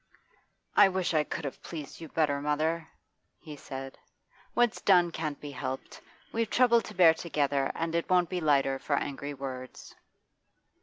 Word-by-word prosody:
'I 205 Hz, -1 st, +8 dB
wish 185 Hz, -2 st, -1 dB
I 155 Hz, -1 st, +3 dB
could 150 Hz, +1 st, -5 dB
have 140 Hz, -, -6 dB
pleased 155 Hz, -1 st, -8 dB
you 165 Hz, -, -7 dB
better, 145 Hz, -3 st, +1 dB
mother,' 155 Hz, +3 st, 0 dB, 0.5 s
he 150 Hz, -2 st, -9 dB
said. 135 Hz, -1 st, -8 dB, 0.6 s
'What's 240 Hz, -2 st, +2 dB
done 175 Hz, -3 st, +4 dB
can't 155 Hz, -3 st, -4 dB
be 145 Hz, -, -7 dB
helped. 130 Hz, 0 st, -6 dB, 0.3 s
We've 225 Hz, -1 st, -1 dB
trouble 235 Hz, -2 st, +4 dB
to -, -, -10 dB
bear 170 Hz, -3 st, +7 dB
together, 145 Hz, -4 st, 0 dB
and 165 Hz, 0 st, -2 dB
it 170 Hz, 0 st, -1 dB
won't 180 Hz, -1 st, +4 dB
be 180 Hz, -1 st, -2 dB
lighter 135 Hz, -3 st, +2 dB
for 145 Hz, -, 0 dB
angry 140 Hz, +1 st, -4 dB
words. 130 Hz, -2 st, -8 dB
155 Hz, 160 wpm, -29 LUFS, 140-175 Hz, 0.6 s, I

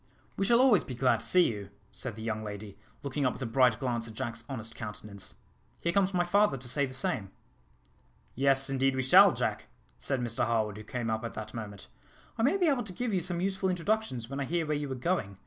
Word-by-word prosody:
"We 195 Hz, -, 0 dB
shall 235 Hz, +3 st, +5 dB
always 250 Hz, -7 st, +5 dB
be 130 Hz, -, -7 dB
glad 125 Hz, -2 st, +3 dB
to 115 Hz, -, -7 dB
see 180 Hz, +7 st, +5 dB
you," 100 Hz, -3 st, -5 dB, 0.2 s
said 125 Hz, -5 st, -6 dB
the 110 Hz, -, -8 dB
young 110 Hz, -1 st, -2 dB
lady, 105 Hz, -1 st, -7 dB, 0.3 s
looking 140 Hz, +1 st, -2 dB
up 125 Hz, -, +2 dB
with -, -, -11 dB
a -, -, -2 dB
bright 120 Hz, -1 st, +3 dB
glance 120 Hz, -3 st, -2 dB
at 110 Hz, -, -10 dB
Jack's 115 Hz, +1 st, -4 dB
honest 115 Hz, -4 st, -4 dB
countenance. 105 Hz, -3 st, -7 dB, 0.4 s
"Here 170 Hz, -, 0 dB
comes 195 Hz, 0 st, +3 dB
my 180 Hz, -2 st, +2 dB
father 200 Hz, -4 st, +3 dB
to 125 Hz, 0 st, -7 dB
say 140 Hz, +3 st, +1 dB
the 130 Hz, -, -9 dB
same." 105 Hz, -6 st, -1 dB, 1.0 s
"Yes, 135 Hz, +1 st, +3 dB
indeed 135 Hz, -1 st, +1 dB
we 130 Hz, -, 0 dB
shall, 130 Hz, -, +8 dB
Jack," -, -, -2 dB, 0.3 s
said 135 Hz, -2 st, -1 dB
Mr 120 Hz, -1 st, -1 dB
Harwood, 110 Hz, -3 st, 0 dB
who 105 Hz, -, -8 dB
came 120 Hz, 0 st, -3 dB
up 110 Hz, +1 st, -2 dB
at 115 Hz, -, -5 dB
that 110 Hz, 0 st, -6 dB
moment. 105 Hz, -4 st, -7 dB, 0.5 s
"I -, -, -3 dB
may 280 Hz, +11 st, +3 dB
be 365 Hz, -, +2 dB
able 275 Hz, -6 st, +2 dB
to 190 Hz, -, -8 dB
give 240 Hz, +3 st, -2 dB
you 185 Hz, -, +1 dB
some 175 Hz, 0 st, -2 dB
useful 190 Hz, 0 st, 0 dB
introductions, 180 Hz, -, -1 dB
when 135 Hz, +2 st, -5 dB
I 140 Hz, -, -1 dB
hear 170 Hz, +2 st, -1 dB
where 150 Hz, 0 st, 0 dB
you 145 Hz, -2 st, -3 dB
are -, -, -2 dB
going. 125 Hz, -, -1 dB
130 Hz, 235 wpm, -30 LUFS, 115-175 Hz, 1.0 s, shall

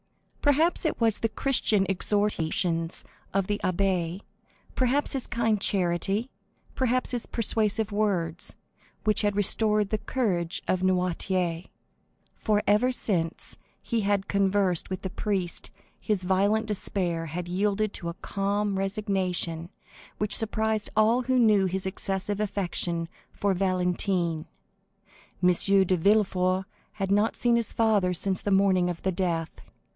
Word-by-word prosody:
Perhaps 310 Hz, +4 st, +3 dB
it 315 Hz, -, -1 dB
was 225 Hz, -3 st, +3 dB
the 225 Hz, -, 0 dB
Christian 215 Hz, -4 st, +1 dB
exhortations 180 Hz, -4 st, 0 dB, 0.3 s
of 195 Hz, -1 st, 0 dB
the 205 Hz, +1 st, -2 dB
abbé, 185 Hz, -1 st, 0 dB, 0.5 s
perhaps 265 Hz, +4 st, +2 dB
his 270 Hz, -3 st, -2 dB
kind 225 Hz, -3 st, 0 dB
charity, 195 Hz, +6 st, 0 dB, 0.4 s
perhaps 255 Hz, 0 st, +1 dB
his 245 Hz, -2 st, -1 dB
persuasive 220 Hz, -1 st, +1 dB
words, 190 Hz, -5 st, -1 dB, 0.5 s
which 215 Hz, -1 st, +2 dB
had 205 Hz, -1 st, 0 dB
restored 210 Hz, 0 st, +2 dB
the 215 Hz, -, 0 dB
courage 195 Hz, -7 st, -2 dB
of 185 Hz, -, +1 dB
Noirtier, 180 Hz, -1 st, 0 dB, 0.7 s
for 210 Hz, -2 st, 0 dB
ever 210 Hz, +5 st, +3 dB
since 175 Hz, -9 st, -2 dB, 0.2 s
he 230 Hz, -2 st, -2 dB
had 200 Hz, -1 st, 0 dB
conversed 195 Hz, -3 st, +1 dB
with 185 Hz, -1 st, -5 dB
the 190 Hz, -, -4 dB
priest 190 Hz, -4 st, -2 dB, 0.3 s
his 205 Hz, -4 st, -1 dB
violent 200 Hz, +4 st, +2 dB
despair 180 Hz, -5 st, -2 dB
had 175 Hz, +3 st, -5 dB
yielded 205 Hz, +3 st, 0 dB
to 170 Hz, -, -4 dB
a 170 Hz, -, -6 dB
calm 200 Hz, +1 st, -2 dB
resignation 190 Hz, -5 st, -1 dB, 0.5 s
which 210 Hz, 0 st, +4 dB
surprised 220 Hz, -1 st, +1 dB
all 225 Hz, +3 st, +4 dB
who 255 Hz, +1 st, 0 dB
knew 210 Hz, -5 st, +4 dB
his 190 Hz, +1 st, -3 dB
excessive 195 Hz, +1 st, -3 dB
affection 175 Hz, -4 st, -2 dB, 0.2 s
for 200 Hz, -1 st, 0 dB
Valentine. 180 Hz, -3 st, -1 dB, 1.0 s
M. 180 Hz, -, +6 dB
de 190 Hz, +1 st, +3 dB
Villefort 190 Hz, 0 st, +2 dB, 0.3 s
had 195 Hz, -2 st, -3 dB
not 205 Hz, +3 st, +2 dB
seen 240 Hz, -1 st, +2 dB
his 235 Hz, -2 st, -1 dB
father 205 Hz, -5 st, +2 dB
since 190 Hz, +2 st, +2 dB
the -, -, -2 dB
morning 190 Hz, -2 st, +3 dB
of 175 Hz, -1 st, -6 dB
the 190 Hz, -, +1 dB
death. 170 Hz, -3 st, -1 dB
195 Hz, 130 wpm, -27 LUFS, 180-215 Hz, 1.0 s, M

